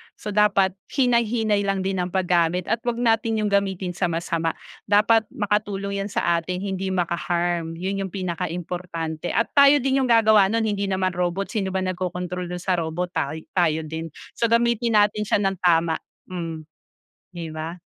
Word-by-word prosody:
So 210 Hz, -, -6 dB
dapat 200 Hz, -2 st, +3 dB, 0.2 s
hinay-hinay 235 Hz, -5 st, +2 dB
lang 195 Hz, -1 st, 0 dB
din 190 Hz, -1 st, -1 dB
ang 180 Hz, -, 0 dB
paggamit 180 Hz, -1 st, +1 dB
at 230 Hz, -, +1 dB
huwag 240 Hz, -1 st, -1 dB
natin 225 Hz, -1 st, +1 dB
'yong 205 Hz, -, 0 dB
gamitin 190 Hz, -2 st, 0 dB
sa 180 Hz, +1 st, -1 dB
masama, 165 Hz, -1 st, -1 dB, 0.3 s
dapat 215 Hz, +2 st, +4 dB
makatulong 200 Hz, -1 st, -1 dB
'yan 195 Hz, -, -2 dB
sa 170 Hz, -3 st, +1 dB
atin, 180 Hz, +3 st, -4 dB
hindi 190 Hz, -1 st, -3 dB
makaharm. 175 Hz, -2 st, -1 dB
Yon 190 Hz, +3 st, -3 dB
yung -, -, -14 dB
pinakaimportante 175 Hz, -2 st, -4 dB
at 230 Hz, -, +1 dB
tayo 280 Hz, 0 st, +7 dB
din 270 Hz, 0 st, +2 dB
yung 250 Hz, -, -1 dB
gagawa 220 Hz, -3 st, +6 dB
no'n 225 Hz, +3 st, 0 dB
hindi 200 Hz, -2 st, -1 dB
naman 185 Hz, -1 st, 0 dB
robot 180 Hz, +2 st, -2 dB
sino 195 Hz, -3 st, -1 dB
ba 190 Hz, -, 0 dB
nagkokontrol 180 Hz, -1 st, -3 dB
do'n 180 Hz, 0 st, -6 dB
sa 180 Hz, -2 st, +1 dB
robot 170 Hz, +2 st, -3 dB
taoy, 155 Hz, +1 st, -3 dB
tayo 160 Hz, -3 st, +1 dB
din. 160 Hz, +1 st, -5 dB, 0.3 s
So 230 Hz, -, +1 dB
gamitin 235 Hz, 0 st, +2 dB
natin 210 Hz, 0 st, +3 dB
siya -, -, +3 dB
nang 195 Hz, -2 st, -1 dB
tama, 165 Hz, -2 st, +2 dB, 0.3 s
mm, 165 Hz, -3 st, -5 dB, 0.7 s
'di 165 Hz, -2 st, -6 dB
ba? 160 Hz, +2 st, -5 dB
190 Hz, 170 wpm, -23 LUFS, 175-210 Hz, 0.7 s, tayo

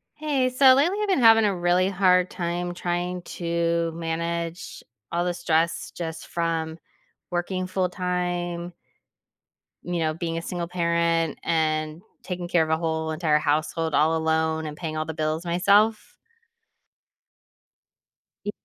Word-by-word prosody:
Hey, 285 Hz, -4 st, 0 dB
so 260 Hz, +1 st, +6 dB
lately, 335 Hz, +9 st, +2 dB
I've 420 Hz, -, 0 dB
been 380 Hz, -, +2 dB
having 225 Hz, -2 st, +7 dB
a 200 Hz, -, +1 dB
really 175 Hz, +1 st, +2 dB
hard 185 Hz, -2 st, +3 dB
time 175 Hz, 0 st, -3 dB
trying 175 Hz, 0 st, -2 dB
to 170 Hz, -1 st, -1 dB
manage 170 Hz, +1 st, -4 dB, 0.3 s
all 170 Hz, +1 st, 0 dB
the 180 Hz, -, 0 dB
stress 165 Hz, -1 st, 0 dB
just 160 Hz, -2 st, -5 dB
from 165 Hz, -1 st, -2 dB, 0.5 s
working 185 Hz, +1 st, -2 dB
full 185 Hz, -1 st, 0 dB
time 175 Hz, -1 st, -3 dB, 1.1 s
you 175 Hz, -1 st, -2 dB
know, 155 Hz, -1 st, 0 dB
being 165 Hz, 0 st, -3 dB
a -, -, -2 dB
single 170 Hz, 0 st, -4 dB
parent, 170 Hz, -2 st, 0 dB
and 155 Hz, 0 st, 0 dB, 0.2 s
taking 180 Hz, -1 st, -4 dB
care 175 Hz, -2 st, +3 dB
of 160 Hz, -, -4 dB
a 160 Hz, -, +2 dB
whole 160 Hz, -1 st, -2 dB
entire 155 Hz, -1 st, +2 dB
household 155 Hz, +1 st, 0 dB
all 160 Hz, +2 st, +3 dB
alone 160 Hz, 0 st, 0 dB
and 150 Hz, -1 st, -6 dB
paying 155 Hz, -1 st, -5 dB
all 155 Hz, -, -1 dB
the 160 Hz, -, -5 dB
bills 155 Hz, +1 st, -2 dB
myself. 200 Hz, +5 st, +2 dB, 2.3 s
Y 205 Hz, -, -2 dB
170 Hz, 140 wpm, -25 LUFS, 160-180 Hz, 2.3 s, having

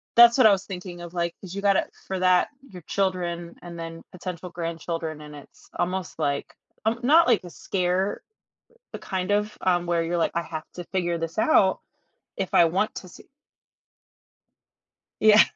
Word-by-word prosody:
That's 235 Hz, 0 st, +9 dB
what 255 Hz, -4 st, +6 dB
I 215 Hz, -, +8 dB
was 195 Hz, 0 st, 0 dB
thinking 180 Hz, -2 st, -7 dB
of, 175 Hz, 0 st, -9 dB
like, 170 Hz, -1 st, -1 dB
'cause 190 Hz, -1 st, -9 dB
you 200 Hz, -, -4 dB
gotta 200 Hz, -1 st, +3 dB, 0.2 s
for 190 Hz, -, -3 dB
that, 185 Hz, 0 st, +4 dB, 0.2 s
your 180 Hz, -3 st, -11 dB
children 175 Hz, -2 st, -2 dB
and 170 Hz, -1 st, -9 dB
then 165 Hz, 0 st, -7 dB
potential 180 Hz, -1 st, -6 dB
grandchildren, 165 Hz, -2 st, -4 dB
and 150 Hz, 0 st, -10 dB
it's 145 Hz, -, -16 dB
almost 185 Hz, 0 st, -2 dB
like, 140 Hz, 0 st, -2 dB, 0.3 s
um 230 Hz, +2 st, 0 dB
not 310 Hz, +7 st, +6 dB
like 235 Hz, -6 st, +3 dB
the 175 Hz, -, -10 dB
scare, 185 Hz, +2 st, -1 dB, 0.7 s
but -, -, -7 dB
kind 185 Hz, 0 st, -3 dB
of, 210 Hz, +1 st, 0 dB
um, 175 Hz, -1 st, +1 dB
where 170 Hz, -1 st, +1 dB
you're 170 Hz, +1 st, -1 dB
like, 170 Hz, -, +1 dB
"I 170 Hz, -, 0 dB
have 155 Hz, -2 st, -6 dB
to 175 Hz, -, -6 dB
figure 175 Hz, -2 st, -1 dB
this 165 Hz, +2 st, -5 dB
out, 210 Hz, -7 st, +4 dB, 0.6 s
if 190 Hz, -, -3 dB
I 170 Hz, -, +7 dB
want 190 Hz, +6 st, 0 dB
to 185 Hz, -, -7 dB
see." -, -, -15 dB, 2.0 s
Yeah. 215 Hz, 0 st, +8 dB
180 Hz, 175 wpm, -25 LUFS, 170-195 Hz, 2.0 s, That's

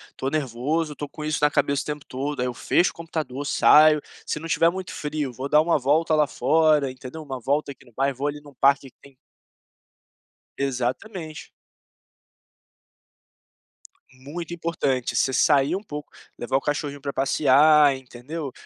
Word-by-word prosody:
tô 135 Hz, -, -3 dB
nervoso, 150 Hz, +3 st, -2 dB
tô 145 Hz, +1 st, -6 dB
com 150 Hz, -, -9 dB
isso 155 Hz, -1 st, -1 dB
na 150 Hz, -, +4 dB
cabeça 140 Hz, -1 st, +1 dB
o -, -, -17 dB
tempo 150 Hz, -1 st, -5 dB
todo, 140 Hz, +2 st, -4 dB
aí 125 Hz, -, 0 dB
eu 125 Hz, -, -3 dB
fecho 175 Hz, -, +1 dB
o -, -, -23 dB
computador, 155 Hz, -5 st, -5 dB
saio, 150 Hz, +1 st, +5 dB, 0.2 s
se -, -, -3 dB
não 165 Hz, -, -7 dB
tiver 165 Hz, 0 st, +3 dB
muito 185 Hz, +1 st, -6 dB
frio 150 Hz, -2 st, -3 dB
vou 130 Hz, +4 st, -5 dB
dar 150 Hz, -, +5 dB
uma 165 Hz, +1 st, +2 dB
volta 155 Hz, +4 st, +2 dB
lá 150 Hz, -1 st, +4 dB
fora 145 Hz, +3 st, +2 dB
entendeu, 130 Hz, +5 st, -9 dB
uma 135 Hz, -4 st, -6 dB
volta 140 Hz, +4 st, -1 dB
aqui 130 Hz, -, -22 dB
no 120 Hz, -, -19 dB
bairro, 135 Hz, +3 st, 0 dB
vou 140 Hz, +2 st, -1 dB
ali 145 Hz, 0 st, -4 dB
num 145 Hz, -1 st, -15 dB
parque 140 Hz, +1 st, +2 dB
que -, -, -35 dB
tem 140 Hz, -1 st, -18 dB, 1.4 s
Exatamente. 140 Hz, -, -4 dB, 2.6 s
Muito 145 Hz, +6 st, -8 dB
importante, 145 Hz, -7 st, -2 dB
você 135 Hz, -, +2 dB
sair 140 Hz, +4 st, +3 dB
um 195 Hz, -, -5 dB
pouco, 150 Hz, -6 st, -8 dB, 0.3 s
levar 125 Hz, +2 st, 0 dB
o -, -, -3 dB
cachorrinho 145 Hz, -1 st, -3 dB
pra 140 Hz, 0 st, -4 dB
passear 145 Hz, +1 st, +4 dB
entendeu, 130 Hz, +4 st, -7 dB
145 Hz, 165 wpm, -24 LUFS, 135-155 Hz, 2.6 s, saio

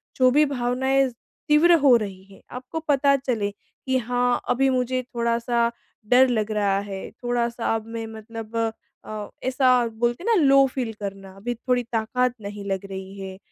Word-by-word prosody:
जो 255 Hz, -1 st, +5 dB
भी 300 Hz, +3 st, +5 dB
भावनाएँ 265 Hz, 0 st, +1 dB, 0.4 s
तीव्र 310 Hz, +4 st, +6 dB
हो 275 Hz, -4 st, +6 dB
रही 195 Hz, -3 st, -6 dB
हैं, 195 Hz, 0 st, -17 dB
आपको 255 Hz, +6 st, -5 dB
पता 280 Hz, -1 st, +4 dB
चले 240 Hz, -7 st, -1 dB
कि 260 Hz, +5 st, -4 dB
हाँ, 245 Hz, +1 st, 0 dB
अभी 270 Hz, +2 st, +3 dB
मुझे 255 Hz, 0 st, 0 dB
थोड़ा-सा 235 Hz, 0 st, +1 dB, 0.4 s
डर 260 Hz, +1 st, +7 dB
लग 220 Hz, -3 st, 0 dB
रहा 200 Hz, -2 st, +1 dB
है, 195 Hz, -1 st, -6 dB
थोड़ा-सा 235 Hz, -1 st, -1 dB
अब 220 Hz, -1 st, -4 dB
मैं 225 Hz, -, -3 dB
मतलब 225 Hz, 0 st, -9 dB, 0.5 s
अ, 215 Hz, -1 st, -6 dB
ऐसा 260 Hz, 0 st, +2 dB, 0.2 s
बोलते 240 Hz, +7 st, -2 dB
हैं 460 Hz, 0 st, +3 dB
ना, 325 Hz, -, +3 dB
लो 275 Hz, 0 st, +6 dB
फ़ील 255 Hz, -3 st, -4 dB
करना 195 Hz, -1 st, -6 dB
अभी 240 Hz, +5 st, -3 dB
थोड़ी 245 Hz, +1 st, 0 dB
ताकत 245 Hz, +3 st, +1 dB
नहीं 205 Hz, 0 st, -7 dB
लग 195 Hz, +1 st, -2 dB
रही 190 Hz, +1 st, -7 dB
है, 190 Hz, -1 st, -7 dB
240 Hz, 170 wpm, -24 LUFS, 215-260 Hz, 0.5 s, डर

